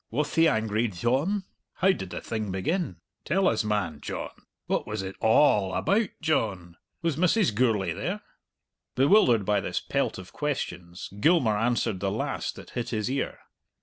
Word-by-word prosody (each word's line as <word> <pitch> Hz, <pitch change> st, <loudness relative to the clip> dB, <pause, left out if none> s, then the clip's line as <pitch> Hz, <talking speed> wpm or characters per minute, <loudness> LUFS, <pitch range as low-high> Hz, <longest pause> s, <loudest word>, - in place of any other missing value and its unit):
"Wath 145 Hz, +6 st, -1 dB
he 165 Hz, 0 st, +5 dB
angry, 110 Hz, -4 st, +1 dB
Dyohn?" 130 Hz, -, 0 dB, 0.3 s
"How 190 Hz, +1 st, +3 dB
did 95 Hz, -, -4 dB
the -, -, -5 dB
thing 110 Hz, -2 st, -3 dB
begin?" 95 Hz, -, -1 dB, 0.3 s
"Tell 190 Hz, +4 st, +2 dB
us, 115 Hz, -, +2 dB
man, 100 Hz, -8 st, -1 dB
John." -, -, -5 dB, 0.3 s
"What -, -, -1 dB
was 105 Hz, -2 st, -3 dB
it 95 Hz, 0 st, -6 dB
a -, -, -1 dB
all 105 Hz, -6 st, +4 dB
about, 205 Hz, +1 st, +2 dB
John?" 95 Hz, -, -1 dB, 0.3 s
"Was 165 Hz, -4 st, 0 dB
Mrs. 180 Hz, -, +3 dB
Gourlay 105 Hz, -6 st, +1 dB
there?" 180 Hz, -, -3 dB, 0.7 s
Bewildered 130 Hz, -, +5 dB
by 105 Hz, 0 st, +2 dB
this -, -, -2 dB
pelt -, -, -1 dB
of 95 Hz, -1 st, -10 dB
questions, 90 Hz, -, -4 dB
Gilmour 130 Hz, -5 st, +4 dB
answered 115 Hz, -2 st, 0 dB
the 100 Hz, +1 st, 0 dB
last 105 Hz, +3 st, -2 dB
that -, -, -12 dB
hit 120 Hz, 0 st, -3 dB
his 110 Hz, +1 st, -1 dB
ear. 135 Hz, -, -2 dB
115 Hz, 165 wpm, -27 LUFS, 100-155 Hz, 0.7 s, he